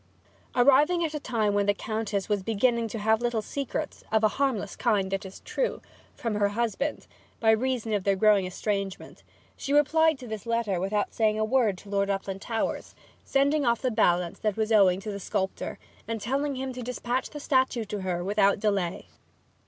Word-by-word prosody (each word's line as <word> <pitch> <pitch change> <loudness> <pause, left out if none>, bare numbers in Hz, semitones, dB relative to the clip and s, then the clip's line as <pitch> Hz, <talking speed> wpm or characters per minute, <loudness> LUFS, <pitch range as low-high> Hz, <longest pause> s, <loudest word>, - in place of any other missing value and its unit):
Arriving 290 +7 +4
at 310 - -4
a 300 - -2
time 220 -6 0
when 205 0 +1
the 205 - +3
Countess 215 -2 -3
was 205 -2 0
beginning 230 +3 +1
to 225 - -5
have 220 +2 +2
little 240 -2 0
secrets 275 +4 -4
(of 220 0 +2
a - - +7
harmless 250 -6 -1
kind, 195 -2 +1
it 195 0 -2
is 190 - -12
true) - - -2 0.4
from 230 -2 -3
her 205 -1 +2
husband, 235 +6 -2 0.3
by 220 -1 +4
reason 235 -1 0
of 205 -2 0
their 195 0 +2
growing 200 -1 +4
estrangement, 195 +1 -4 0.3
she 275 - -5
replied 315 +1 +4
to 260 - -10
this 220 0 -6
letter 230 -5 0
without 205 +3 -1
saying 215 -1 +2
a 215 - +1
word 220 -5 +2
to 205 - -14
Lord 200 0 0
Uplandtowers, 195 +3 -3 0.3
sending 280 +2 +2
off 235 -1 +1
the 255 - +1
balance 180 -5 +1
that 215 -2 -1
was 220 0 0
owing 190 -4 +5
to 210 - -5
the 200 - -5
sculptor, 190 0 -3 0.3
and 225 -1 -3
telling 275 +6 -1
him 260 0 -4
to 250 - -6
despatch 250 +1 -2
the 295 - -8
statue 260 -5 +1
to 210 -1 -5
her 180 -2 -2
without 200 +1 +2
delay. 200 -4 -1
220 Hz, 190 wpm, -27 LUFS, 200-250 Hz, 0.4 s, a